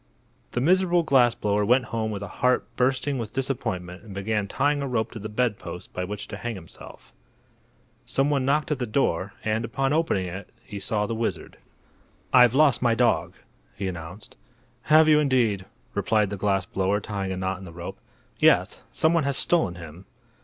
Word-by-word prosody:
The 120 Hz, -, 0 dB
miserable 175 Hz, +2 st, +3 dB
glass 125 Hz, -6 st, +4 dB
blower 105 Hz, 0 st, 0 dB
went 125 Hz, +4 st, +3 dB
home 110 Hz, -1 st, -1 dB
with 100 Hz, -2 st, -4 dB
a -, -, -5 dB
heart 125 Hz, 0 st, +3 dB
bursting 130 Hz, +2 st, 0 dB
with 110 Hz, -3 st, -5 dB
disappointment 95 Hz, -9 st, -3 dB
and 105 Hz, -3 st, -11 dB
began 105 Hz, +1 st, -1 dB
tying 145 Hz, +6 st, +1 dB
a 140 Hz, -, -2 dB
rope 115 Hz, -3 st, -1 dB
to 115 Hz, -, -8 dB
the 110 Hz, +1 st, -6 dB
bedpost 105 Hz, -7 st, -3 dB
by 90 Hz, -, -3 dB
which 100 Hz, +2 st, -6 dB
to -, -, -6 dB
hang 120 Hz, -1 st, -4 dB
himself. 85 Hz, -4 st, -13 dB, 0.9 s
Some 135 Hz, +2 st, 0 dB
one 140 Hz, -3 st, +1 dB
knocked 150 Hz, +3 st, +1 dB
at 145 Hz, -, 0 dB
the 125 Hz, -, -2 dB
door, 100 Hz, -5 st, 0 dB
and, 110 Hz, +1 st, 0 dB
upon 135 Hz, +4 st, -1 dB
opening 155 Hz, -, +1 dB
it, 95 Hz, +3 st, -7 dB
he 105 Hz, -2 st, -7 dB
saw 105 Hz, +1 st, 0 dB
the 115 Hz, -, -3 dB
wizard. 115 Hz, 0 st, -3 dB, 0.8 s
"I've 125 Hz, -1 st, +6 dB
lost 145 Hz, -2 st, +4 dB
my 120 Hz, -2 st, +3 dB
dog," 120 Hz, -1 st, +1 dB, 0.4 s
he 100 Hz, -1 st, -3 dB
announced. 90 Hz, +3 st, -8 dB, 0.5 s
"Have 155 Hz, +1 st, +6 dB
you, 155 Hz, -1 st, +6 dB
indeed?" 120 Hz, -9 st, +1 dB, 0.3 s
replied 105 Hz, -2 st, +1 dB
the -, -, -2 dB
glass 100 Hz, -1 st, 0 dB
blower 95 Hz, +2 st, 0 dB
tying 100 Hz, -2 st, -4 dB
a 95 Hz, -, -3 dB
knot 95 Hz, 0 st, -2 dB
in -, -, -11 dB
the 85 Hz, -, -10 dB
rope. 85 Hz, +1 st, -8 dB, 0.4 s
"Yes; -, -, +3 dB
some 160 Hz, +1 st, +2 dB
one 165 Hz, -4 st, +2 dB
has 140 Hz, -1 st, 0 dB
stolen 160 Hz, -, +1 dB
him." 85 Hz, +2 st, -11 dB
110 Hz, 190 wpm, -25 LUFS, 100-135 Hz, 0.9 s, I've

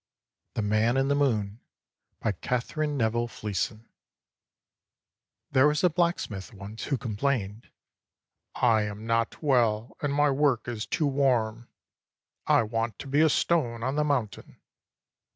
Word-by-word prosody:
THE 110 Hz, -, -1 dB
MAN 110 Hz, +4 st, +2 dB
IN 135 Hz, +1 st, +2 dB
THE 140 Hz, -, +3 dB
MOON 110 Hz, -7 st, 0 dB, 0.6 s
BY 110 Hz, -, +1 dB
KATHERINE 140 Hz, -, -2 dB
NEVILLE 120 Hz, 0 st, +1 dB
FLEESON 110 Hz, 0 st, -4 dB, 1.6 s
There 130 Hz, +1 st, +5 dB
was 150 Hz, +2 st, +1 dB
a 180 Hz, -, +4 dB
blacksmith 155 Hz, -, -1 dB
once 100 Hz, +3 st, -8 dB
who 140 Hz, -, 0 dB
complained: 115 Hz, -3 st, -2 dB, 0.9 s
''I 110 Hz, -3 st, +3 dB
am 105 Hz, +2 st, -8 dB
not 115 Hz, +5 st, -1 dB
well, 120 Hz, -5 st, +2 dB
and 145 Hz, -, 0 dB
my 145 Hz, 0 st, +3 dB
work 135 Hz, -4 st, +1 dB
is 115 Hz, -3 st, -4 dB
too 155 Hz, -, 0 dB
warm. 120 Hz, -5 st, +1 dB, 0.8 s
I -, -, +5 dB
want 115 Hz, +1 st, -2 dB
to -, -, -8 dB
be 145 Hz, +3 st, +2 dB
a 160 Hz, -, +5 dB
stone 125 Hz, -8 st, +1 dB
on 130 Hz, +2 st, -1 dB
the 150 Hz, -, +2 dB
mountain. 125 Hz, -9 st, -2 dB
120 Hz, 135 wpm, -27 LUFS, 110-140 Hz, 1.6 s, There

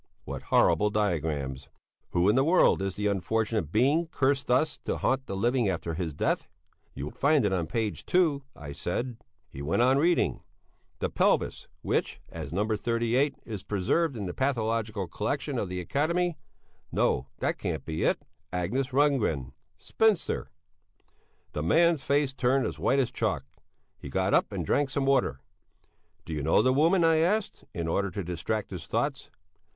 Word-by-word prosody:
What -, -, -5 dB
horrible 105 Hz, -, +3 dB
diagrams! 80 Hz, -10 st, -1 dB, 0.4 s
"Who 90 Hz, +2 st, +2 dB
in 105 Hz, -, +4 dB
the 135 Hz, -, +4 dB
world 165 Hz, -, +4 dB
is 95 Hz, -1 st, -2 dB
the 105 Hz, -, -3 dB
unfortunate 105 Hz, -2 st, 0 dB
being 140 Hz, -, +3 dB
cursed 140 Hz, -3 st, 0 dB
thus 145 Hz, +5 st, +2 dB
to -, -, -1 dB
haunt 135 Hz, 0 st, 0 dB
the 95 Hz, -, -4 dB
living 120 Hz, +2 st, +1 dB
after 85 Hz, -2 st, -2 dB
his 80 Hz, -3 st, -3 dB
death?" -, -, 0 dB, 0.5 s
"You 70 Hz, -, -4 dB
will 75 Hz, -, -6 dB
find 145 Hz, -3 st, +2 dB
it 100 Hz, -, +1 dB
on 85 Hz, -4 st, -1 dB
page 110 Hz, +4 st, -3 dB
2," 165 Hz, -6 st, +3 dB
I 75 Hz, -2 st, -8 dB
said. 120 Hz, -, -3 dB, 0.3 s
He 65 Hz, -, -9 dB
went 80 Hz, +11 st, +1 dB
on 130 Hz, +2 st, +4 dB
reading. 170 Hz, +3 st, +2 dB, 0.6 s
"The -, -, -2 dB
pelvis -, -, +1 dB, 0.2 s
which, -, -, -1 dB
as -, -, -7 dB
No. 100 Hz, +5 st, 0 dB
38, 120 Hz, +5 st, +1 dB
is 105 Hz, -4 st, -5 dB
preserved 120 Hz, -, 0 dB
in 105 Hz, -, -4 dB
the 90 Hz, -, -4 dB
pathological 115 Hz, -6 st, -1 dB
collection -, -, -2 dB
of -, -, -3 dB
the 90 Hz, 0 st, -3 dB
Academy...." 170 Hz, -, 0 dB, 0.6 s
No 65 Hz, -, +1 dB
that -, -, -1 dB
can't -, -, -3 dB
be 80 Hz, 0 st, -3 dB
it. -, -, +2 dB, 0.3 s
"Agnes 95 Hz, +10 st, -1 dB
Rundgren, 125 Hz, -, +1 dB, 0.2 s
spinster...." 220 Hz, -5 st, +1 dB, 1.0 s
The 75 Hz, -, -3 dB
man's 165 Hz, -, +3 dB
face 140 Hz, -1 st, +1 dB
turned 130 Hz, +1 st, +2 dB
as -, -, -4 dB
white 135 Hz, -, +2 dB
as 130 Hz, -3 st, +1 dB
chalk. 100 Hz, -, -1 dB, 0.5 s
He 70 Hz, -, -8 dB
got -, -, 0 dB
up -, -, +3 dB
and -, -, -3 dB
drank 145 Hz, -1 st, +1 dB
some 140 Hz, 0 st, -1 dB
water. 125 Hz, -, +2 dB, 0.8 s
"Did 80 Hz, -, -5 dB
you -, -, -2 dB
know 80 Hz, +3 st, +3 dB
the 130 Hz, -, +3 dB
woman?" 165 Hz, +6 st, +4 dB
I 165 Hz, -1 st, +5 dB
asked, 195 Hz, +6 st, 0 dB
in 85 Hz, -5 st, -3 dB
order 100 Hz, +4 st, 0 dB
to 100 Hz, +1 st, -4 dB
distract 90 Hz, +6 st, -3 dB
his 85 Hz, -3 st, -7 dB
thoughts. 135 Hz, +5 st, -2 dB
115 Hz, 170 wpm, -28 LUFS, 90-140 Hz, 1.0 s, I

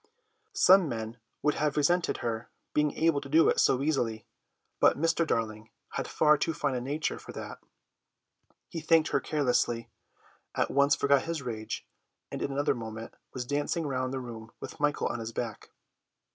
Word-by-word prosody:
Some 185 Hz, -4 st, +6 dB
men 115 Hz, 0 st, -5 dB, 0.2 s
would 150 Hz, -, +3 dB
have 150 Hz, -1 st, -1 dB
resented 175 Hz, +4 st, +2 dB
her 115 Hz, 0 st, -3 dB, 0.2 s
being 150 Hz, -1 st, +2 dB
able 160 Hz, -3 st, +3 dB
to 140 Hz, -, -9 dB
do 160 Hz, +3 st, +5 dB
it -, -, +2 dB
so 135 Hz, +1 st, +3 dB
easily, 120 Hz, -8 st, 0 dB, 0.5 s
but -, -, +5 dB
Mr. 165 Hz, +2 st, +1 dB
Darling 110 Hz, -2 st, -2 dB, 0.2 s
had -, -, -3 dB
far 150 Hz, -1 st, +4 dB
too 165 Hz, +1 st, 0 dB
fine 145 Hz, -2 st, 0 dB
a 125 Hz, -, -2 dB
nature 145 Hz, +5 st, -2 dB
for -, -, -10 dB
that; -, -, -7 dB, 1.1 s
he 165 Hz, -, -5 dB
thanked 160 Hz, 0 st, +4 dB
her 140 Hz, -, +2 dB
carelessly, 125 Hz, -6 st, 0 dB, 0.6 s
at -, -, +1 dB
once 140 Hz, +1 st, +4 dB
forgot 140 Hz, -1 st, +3 dB
his 165 Hz, -3 st, -3 dB
rage, 110 Hz, -3 st, -5 dB, 0.5 s
and -, -, -5 dB
in -, -, -1 dB
another 145 Hz, +1 st, +1 dB
moment 115 Hz, -2 st, -7 dB, 0.2 s
was 125 Hz, -2 st, -4 dB
dancing 145 Hz, +5 st, -1 dB
round 130 Hz, -2 st, -1 dB
the 135 Hz, -, -2 dB
room 115 Hz, -3 st, -8 dB
with -, -, -8 dB
Michael 145 Hz, 0 st, +1 dB
on 120 Hz, -, -1 dB
his 115 Hz, 0 st, -5 dB
back. 115 Hz, -4 st, -5 dB
140 Hz, 175 wpm, -29 LUFS, 115-150 Hz, 1.1 s, Some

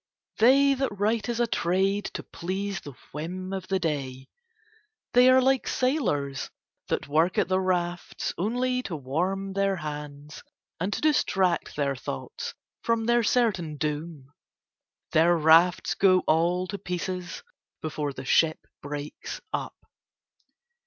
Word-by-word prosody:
They 275 Hz, +4 st, +6 dB
that 270 Hz, 0 st, 0 dB
write 215 Hz, +3 st, 0 dB
as 235 Hz, -1 st, -1 dB
a 240 Hz, -, +4 dB
trade 195 Hz, 0 st, 0 dB
to -, -, -4 dB
please 190 Hz, +2 st, -4 dB
the 145 Hz, -, -9 dB, 0.2 s
whim 185 Hz, +5 st, -5 dB
of 190 Hz, -1 st, -4 dB
the 195 Hz, -, +1 dB
day, 135 Hz, -6 st, -3 dB, 0.8 s
they 250 Hz, +1 st, +7 dB
are 260 Hz, 0 st, +7 dB
like 265 Hz, 0 st, +2 dB
sailors 180 Hz, -, 0 dB, 0.4 s
that -, -, -2 dB
work 160 Hz, +5 st, +2 dB
at -, -, +2 dB
the 185 Hz, 0 st, +2 dB
rafts 175 Hz, -2 st, -2 dB
only 250 Hz, +6 st, 0 dB
to 185 Hz, -9 st, -5 dB
warm 180 Hz, +8 st, -2 dB
their 195 Hz, 0 st, +1 dB
hands 150 Hz, -2 st, -7 dB, 0.4 s
and 185 Hz, +4 st, -1 dB
to -, -, -3 dB
distract 195 Hz, -, +1 dB
their 140 Hz, -2 st, 0 dB
thoughts 95 Hz, -, -6 dB, 0.3 s
from 230 Hz, -1 st, 0 dB
their 240 Hz, +1 st, +3 dB
certain 205 Hz, -10 st, +1 dB
doom; 150 Hz, -2 st, -4 dB, 0.8 s
their 170 Hz, +2 st, +4 dB
rafts 165 Hz, +3 st, +5 dB
go 185 Hz, -2 st, +4 dB
all 175 Hz, +3 st, +2 dB
to 200 Hz, +1 st, -6 dB
pieces 180 Hz, 0 st, -4 dB, 0.4 s
before 150 Hz, -2 st, -2 dB
the 130 Hz, -1 st, -8 dB
ship 160 Hz, +4 st, +2 dB, 0.2 s
breaks 145 Hz, +1 st, -6 dB
up. -, -, -3 dB
180 Hz, 135 wpm, -27 LUFS, 155-205 Hz, 0.8 s, they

